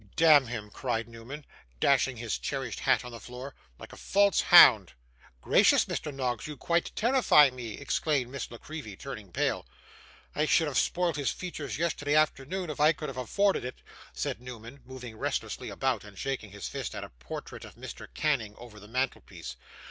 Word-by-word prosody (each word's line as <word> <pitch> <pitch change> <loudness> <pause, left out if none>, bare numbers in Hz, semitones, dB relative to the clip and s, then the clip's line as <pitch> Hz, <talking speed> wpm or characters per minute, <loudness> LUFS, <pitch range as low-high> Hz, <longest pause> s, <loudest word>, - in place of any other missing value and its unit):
'Damn 150 -5 +6
him!' 110 -3 -6
cried 115 -2 -2
Newman, 120 +6 -10 0.3
dashing 135 - +3
his 115 -1 -3
cherished 135 -4 -4
hat - - +2
on 125 - -7
the 115 - -8
floor; 125 +3 -9 0.2
'like - - -11
a - - -9
false 200 0 +3
hound.' - - +8 0.5
'Gracious, - - +5
Mr. 150 - -4
Noggs, 125 -4 -3
you 150 -2 -7
quite 170 +4 0
terrify 225 - +5
me!' 120 -4 -7
exclaimed 145 -3 -1
Miss 140 -2 -5
La 120 - -9
Creevy, 150 -8 -8
turning 110 -6 -8
pale. 75 - -1 0.7
'I 150 - +1
should 165 - +4
have 140 -4 +1
spoilt 175 -3 0
his 145 - 0
features 155 -6 -5
yesterday 150 -3 0
afternoon 155 +3 +1
if 150 - -8
I 155 +2 +6
could 150 -1 -6
have 130 - -8
afforded 195 - +1
it,' 125 +1 -7 0.3
said - - -4
Newman, 125 +1 -10
moving 125 -3 -9
restlessly - - -3
about, 130 -6 -1
and 105 -2 -13
shaking 130 -3 -3
his 100 -1 -7
fist - - -5
at - - -5
a - - -8
portrait - - -8
of - - -12
Mr. - - -9
Canning 125 -9 -1
over 115 -3 -12
the 105 - -13
mantelpiece. 120 - -4
130 Hz, 180 wpm, -29 LUFS, 115-150 Hz, 0.7 s, hound